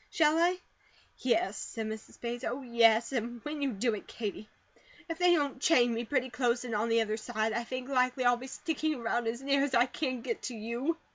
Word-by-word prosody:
Shall 315 0 +3
I?" 355 +2 +3 0.6
"Yes," 295 +9 +1
said 225 -2 -4
Mrs. 220 0 -7
Bates. 240 +1 -4
"Oh, 260 +3 -3
yes, 235 -1 +4
and 240 -1 -2
when 295 0 -4
you 275 -2 +1
do 230 +2 0
it, 210 - -6
Katie, 215 -1 -5 0.6
if 330 -1 -5
they 355 -1 +5
don't 285 -4 -1
chain 245 -9 +4
me 230 +1 -2
pretty 255 0 0
close 245 -1 0
in 235 - -4
on 215 +2 0
the 230 0 +4
other 215 -1 -1
side, 220 -1 -1
I 235 - -1
think 255 +1 -5
likely 255 -1 +1
I'll 245 0 +6
be 250 +2 -8
sticking 310 +2 -2
around 235 -1 -1
as 235 +3 -3
near 275 0 +3
as 275 -2 0
I 235 +1 +6
can 255 -1 -3
get 455 - -3
to 250 - -5
you." 235 +9 -2
245 Hz, 220 wpm, -31 LUFS, 230-280 Hz, 0.6 s, I'll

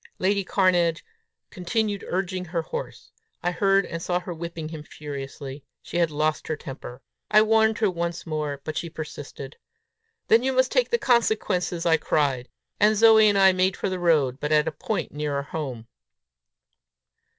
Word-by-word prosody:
Lady 200 +1 +1
Cairnedge 175 -4 +2 0.5
continued 205 +2 -2
urging 185 0 -2
her 170 -1 -2
horse. 480 - -7 0.3
I 175 - +1
heard 195 +2 +2
and 170 -1 -6
saw 180 +1 0
her 180 0 -6
whipping 165 -1 -6
him 160 -2 -7
furiously. 140 -2 -8 0.2
She - - -5
had 170 -2 +3
lost 155 +1 -1
her 155 - -1
temper. 135 -3 -9 0.3
I 215 0 +6
warned 220 0 +3
her 215 -4 +2
once 170 -1 -3
more, 150 -3 -3
but 155 - -5
she 170 - -3
persisted. 145 -3 -8 0.7
"Then 225 - +5
you 265 +1 0
must 260 0 +2
take - - +2
the 475 - +2
consequences!" 210 - +1
I 165 -1 +4
said; 135 -4 0 0.3
and 215 +1 +4
Zoe 220 -1 +7
and 205 - +2
I 190 -1 +7
made 185 0 +1
for - - -2
the 185 -1 -3
road, 150 -7 +2
but 150 - -3
at 150 0 +3
a - - 0
point 195 +8 -3
nearer 145 -1 -2
home. 135 -7 -5
170 Hz, 170 wpm, -25 LUFS, 150-200 Hz, 0.7 s, Zoe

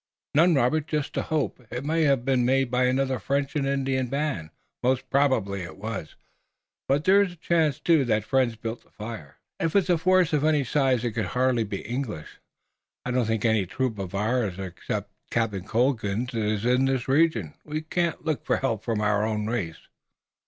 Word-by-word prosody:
"None, 165 +3 +5
Robert, 145 +4 +2
just 150 -2 -2
a - - +1
hope. 150 -4 -2
It 125 +3 -5
might 160 +1 +2
have 135 -4 +2
been 130 -2 +2
made 130 0 +2
by 125 0 +2
another 130 0 +1
French 140 +1 -1
and 140 -2 0
Indian 135 -2 0
band, 140 - -2 0.3
most 130 +1 +1
probably 120 -9 +2
it 90 - -8
was, 105 -6 -6 0.7
but 140 +2 +2
there 195 +4 +6
is 190 -3 0
a - - -14
chance, 160 -4 +1
too, 165 -5 +3
that 110 -3 +1
friends 130 -1 +1
built 115 +1 -6
the - - -28
fire." 105 -11 -8 0.2
"If 165 +2 -1
it's 190 -2 +3
a 170 - +3
force 185 -1 +3
of 150 -1 +2
any 155 -2 +3
size 130 -2 +1
it 120 - 0
could 110 -3 -2
hardly 125 -2 +3
be 100 -1 -5
English. 120 - -5 0.7
I 125 - -2
don't 125 -3 +1
think 115 0 -1
any 110 -4 +2
troop 115 +2 -2
of 95 -1 -5
ours 105 -2 0
except 90 -2 -5 0.2
Captain 105 -5 -1
Colden's 120 0 0
is 110 -1 -1
in 125 +2 +3
this 135 -2 0
region." 135 - +2
"We 155 +1 -4
can't 170 0 -2
look 155 -3 -1
for - - +1
help 115 -6 -1
from 115 -3 -1
our 105 0 +2
own 105 -1 -1
race." 105 -8 -4
125 Hz, 195 wpm, -26 LUFS, 110-145 Hz, 0.7 s, there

